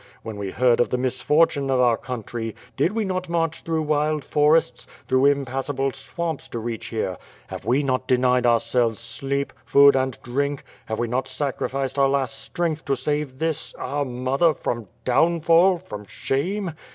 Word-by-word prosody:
When 110 -2 -6
we 100 -1 -4
heard 120 +4 +3
of 120 - +3
the 125 - 0
misfortune 140 +3 +2
oi 130 -1 +2
our 120 -2 +4
country, 115 -2 -5 0.2
did 155 +9 +1
we 220 -1 0
not 185 -2 -3
march 165 -1 -1
through 160 -1 -1
wild 150 0 0
forests, 150 -4 +2 0.2
through 130 +2 +3
impassable 135 0 0
swamps 165 +1 -4
to - - -6
reach 115 0 -4
here; 95 -6 -3 0.3
have - - -7
we 130 +6 +2
not 130 -1 -1
denied 125 -1 +3
ourselves 115 -1 +2 0.2
oleep, 140 +1 -1
food, 140 0 +6
and 130 -2 0
drink; 140 +3 -2 0.2
have 110 - -3
we 120 - -1
not 125 +3 -1
sacrificed 135 0 -2
our 135 0 +4
last 135 0 -1
strength 160 +2 -2
to 135 - +1
save 145 -3 -2
this, 160 0 -2
our 145 +3 -2
mother, 135 +5 +1
from 115 -5 -3 0.2
downfall, 170 +6 +4
from 105 -9 -9
shame? 175 - -2
135 Hz, 165 wpm, -23 LUFS, 125-150 Hz, 0.3 s, food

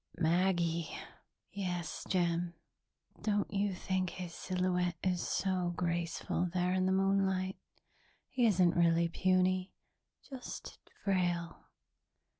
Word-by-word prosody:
"Maggie." 170 -1 +2 0.6
"Yes, 175 -5 -3
Jim. 175 -1 +1 0.7
Don't 205 -1 0
you 200 -1 +1
think 185 0 -1
his 180 -1 -6
silhouette 180 -1 0
is 180 -2 +1
so 185 -2 0
graceful 170 +1 -1
there 180 0 +2
in 185 0 +2
the - - +2
moonlight? 190 -1 +2 0.7
He 245 -3 +2
isn't 180 -4 +4
really 170 0 +4
puny 185 +1 +2 0.5
just 260 -3 -8 0.2
frail." 175 -4 0
180 Hz, 100 wpm, -33 LUFS, 175-190 Hz, 0.7 s, isn't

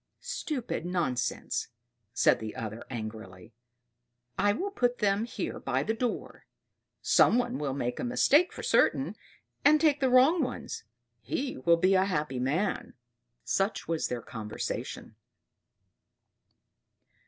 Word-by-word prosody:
"Stupid 260 - -3
nonsense!" 160 -10 -1 0.4
said 120 - +3
the 110 -1 -6
other 115 -2 -5
angrily. 110 -4 -7 0.8
"I 205 +2 +3
will 380 - -2
put 245 -9 +1
them 205 +1 +1
here - - -4
by - - -1
the 220 - 0
door. 240 +1 -4 0.6
Some 235 - +5
one 245 0 -1
will 140 -3 -2
make 125 -3 -2
a - - -2
mistake 285 +7 +4
for - - -8
certain - - +2 0.5
and 300 +2 +6
take 295 -3 +3
the 265 -2 +2
wrong 265 +7 +5
ones 255 - -4 0.3
he 260 - -3
will 170 0 +3
be 185 +3 +3
a 190 0 +4
happy 150 -8 -2
man." 155 +11 -1 0.5
Such 195 +3 -1
was 165 -1 0
their 120 -2 -4
conversation. 110 -2 -5
190 Hz, 130 wpm, -29 LUFS, -, 0.8 s, and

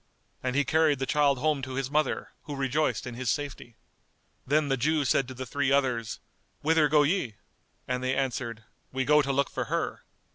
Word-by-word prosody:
And 130 0 -2
he 145 0 +3
carried 155 +1 +3
the 135 - -2
child 145 -1 +3
home 150 +1 +1
to 130 0 -5
his 135 0 -2
mother, 155 +1 0 0.2
who 145 -1 -5
rejoiced 135 +3 0
in 125 - -5
his 125 0 -3
safety. 135 -4 -3 0.7
Then 150 +2 +3
the 135 - +2
Jew 150 +3 +1
said 135 0 +2
to 130 - -8
the 130 +1 -5
three 135 +2 0
others 125 -5 +1 0.4
"Whither 160 0 +4
go 150 0 +5
ye?"; 145 - 0 0.5
and 125 0 -1
they 130 +1 +1
answered, 120 -4 -2 0.3
"We 130 0 -1
go 150 +1 +5
to 140 -1 -1
look 140 0 +1
for - - -2
her." - - -2
135 Hz, 195 wpm, -28 LUFS, 130-150 Hz, 0.7 s, go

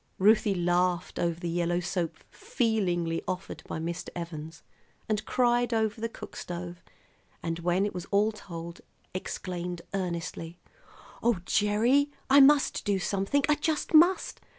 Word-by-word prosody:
Ruthie 210 0 +4
laughed 175 0 0
over 170 -1 0
the 175 - -4
yellow 175 +1 0
soap 175 -2 -2 0.2
feelingly 180 -8 0
offered 185 0 -4
by - - -4
Mr. 170 +2 -4
Evans, 160 -2 -7 0.4
and 215 -1 0
cried 240 -1 +2
over 220 0 0
the 230 - -1
cook - - -10
stove, 175 0 -6 0.6
and 165 0 -2
when 175 +3 +1
it 205 - -3
was 180 -1 -5
all 205 +2 +2
told 170 -5 -8 0.3
exclaimed 180 -1 -4
earnestly: 170 -2 -4 0.6
"Oh, 235 -3 +3
Gerry, 230 +9 +3 0.2
I 280 - +8
must 280 +1 +5
do 200 -2 +1
something; 195 +9 0
I 300 - +5
just 300 +2 -1
must! 350 +4 +4
185 Hz, 140 wpm, -28 LUFS, 170-220 Hz, 0.6 s, I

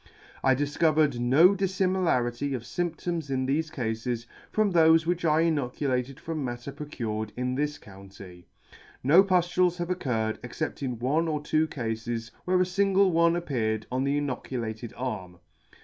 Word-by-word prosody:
I 130 -1 +4
difcovered 145 -1 +2
no 140 +10 +5
diflimilarity 180 -10 0
of 120 - -5
fymptoms 170 +1 -3
in 130 -1 0
thefe 155 +4 0
cafes, 115 -1 -3 0.2
from 215 -3 +1
thofe 160 -1 +5
which 175 +1 -1
I 155 -1 +3
inoculated 135 -4 -1
from 160 -3 -4
matter 120 +1 -5
procured 115 -7 -4
in 125 0 -1
this 150 +2 -1
county. 95 -5 -13 0.6
No 160 +9 +7
puflules 180 -1 +2
have 175 0 -3
occurred, 115 -10 -1
except 145 +7 -4
in 125 -3 -3
one 145 +8 +1
or 155 -2 -1
two 155 +1 +1
cafes, 115 -3 -4
where 185 0 +2
a 185 - +4
fingle 195 +1 +3
one 170 0 +3
appeared 110 -10 -1
on 130 +1 0
the 140 +1 +1
inoculated 120 -5 -4
arm. 105 -8 -5
140 Hz, 150 wpm, -27 LUFS, 120-170 Hz, 0.6 s, No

